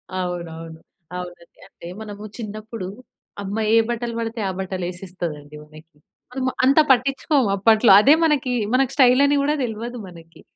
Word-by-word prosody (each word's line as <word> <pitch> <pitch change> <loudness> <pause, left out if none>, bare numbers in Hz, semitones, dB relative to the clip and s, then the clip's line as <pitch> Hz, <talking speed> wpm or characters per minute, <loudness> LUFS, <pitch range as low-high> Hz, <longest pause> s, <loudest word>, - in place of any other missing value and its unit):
అవునవును. 165 -3 -5 0.4
అవునండి. 175 -1 -10
అంటే 170 - -13
మనము 210 -1 -8
చిన్నప్పుడు 215 -2 -7 0.6
అమ్మ 200 +2 -4 0.2
ఏ - - +6
బట్టలు 235 0 -3
పడితే 230 0 -4
ఆ - - -2
బట్టలు 190 -1 -4
వేసేస్తది 175 -3 -6
అండి 145 +1 -15
మనకి. 155 +1 -17 0.4
మనము 260 0 -2
అంత 275 +4 +5
పట్టించుకోము 270 0 +2
అప్పట్లో. 220 +2 +4
అదే 280 +6 +6
మనకి 285 -5 +1 0.2
మన 255 - +4
స్టైల్ 255 -1 +5
అని 285 0 +2
కూడా, 290 +2 +1
తెలవదు 235 +2 -5
మనకి 165 -2 -15
215 Hz, 150 wpm, -21 LUFS, 175-250 Hz, 0.6 s, ఏ